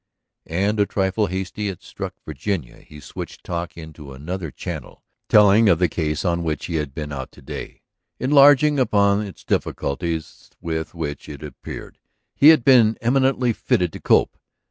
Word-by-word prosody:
And, 100 Hz, +6 st, 0 dB
a 100 Hz, -, +3 dB
trifle 95 Hz, +2 st, 0 dB
hastily 95 Hz, +3 st, -4 dB
it 95 Hz, -4 st, -6 dB
struck -, -, -7 dB
Virginia, 80 Hz, -2 st, -4 dB
he 75 Hz, -, -14 dB
switched 70 Hz, -, -9 dB
talk 85 Hz, -1 st, -5 dB
into 80 Hz, -4 st, -10 dB
another 80 Hz, +5 st, -5 dB
channel, -, -, -8 dB, 0.3 s
telling 105 Hz, +1 st, +6 dB
of 85 Hz, -, +4 dB
the 90 Hz, +1 st, +2 dB
case 75 Hz, 0 st, -2 dB
on 85 Hz, -1 st, +1 dB
which 75 Hz, -3 st, -3 dB
he 85 Hz, -, -2 dB
had 75 Hz, -3 st, -4 dB
been 75 Hz, -2 st, -5 dB
out 65 Hz, -2 st, -6 dB
to -, -, -16 dB
day, -, -, -8 dB, 0.4 s
enlarging 145 Hz, +1 st, +5 dB
upon 100 Hz, -4 st, +3 dB
its 100 Hz, -3 st, -8 dB
difficulties, 80 Hz, +3 st, -3 dB
with 80 Hz, 0 st, -4 dB
which, 75 Hz, -4 st, -5 dB
it 75 Hz, -1 st, -9 dB
appeared, 75 Hz, -4 st, -9 dB, 0.3 s
he 145 Hz, -, +5 dB
had 155 Hz, -7 st, +5 dB
been 115 Hz, -5 st, +5 dB
eminently 130 Hz, 0 st, +2 dB
fitted 90 Hz, -, 0 dB
to -, -, -8 dB
cope. -, -, +2 dB
90 Hz, 165 wpm, -22 LUFS, 80-105 Hz, 0.4 s, telling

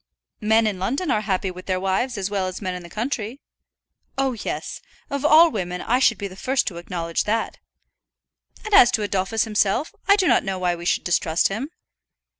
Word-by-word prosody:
"Men 220 Hz, +1 st, +3 dB
in 205 Hz, -4 st, -1 dB
London 270 Hz, -, -1 dB
are 210 Hz, -, +1 dB
happy 190 Hz, -2 st, -1 dB
with 185 Hz, 0 st, -11 dB
their 185 Hz, -1 st, 0 dB
wives 195 Hz, +6 st, -1 dB
as 195 Hz, -1 st, -1 dB
well 195 Hz, -2 st, -1 dB
as 185 Hz, -, -5 dB
men 185 Hz, -3 st, -3 dB
in 180 Hz, -, -6 dB
the 170 Hz, -, -12 dB
country." 230 Hz, +4 st, -4 dB, 0.8 s
"Oh, 270 Hz, -1 st, +1 dB
yes; 225 Hz, -, -5 dB, 0.3 s
of 280 Hz, 0 st, -2 dB
all 315 Hz, +2 st, +7 dB
women 180 Hz, -5 st, -3 dB
I 245 Hz, +6 st, +1 dB
should 235 Hz, -4 st, +3 dB
be 200 Hz, -, -4 dB
the 185 Hz, -, -12 dB
first 260 Hz, +6 st, 0 dB
to 175 Hz, -, -11 dB
acknowledge 170 Hz, -1 st, -3 dB
that." 225 Hz, +2 st, -1 dB, 1.1 s
"And 430 Hz, -, -4 dB
as 320 Hz, -12 st, +8 dB
to 215 Hz, -, +1 dB
Adolphus 200 Hz, +2 st, 0 dB
himself, 210 Hz, -, 0 dB
I 400 Hz, -, +7 dB
do 395 Hz, -2 st, +1 dB
not -, -, +4 dB
know 195 Hz, -2 st, -3 dB
why 180 Hz, -1 st, 0 dB
we 170 Hz, 0 st, -8 dB
should -, -, +1 dB
distrust 170 Hz, -2 st, +1 dB
him." 225 Hz, +9 st, -4 dB
205 Hz, 205 wpm, -23 LUFS, 185-245 Hz, 1.1 s, as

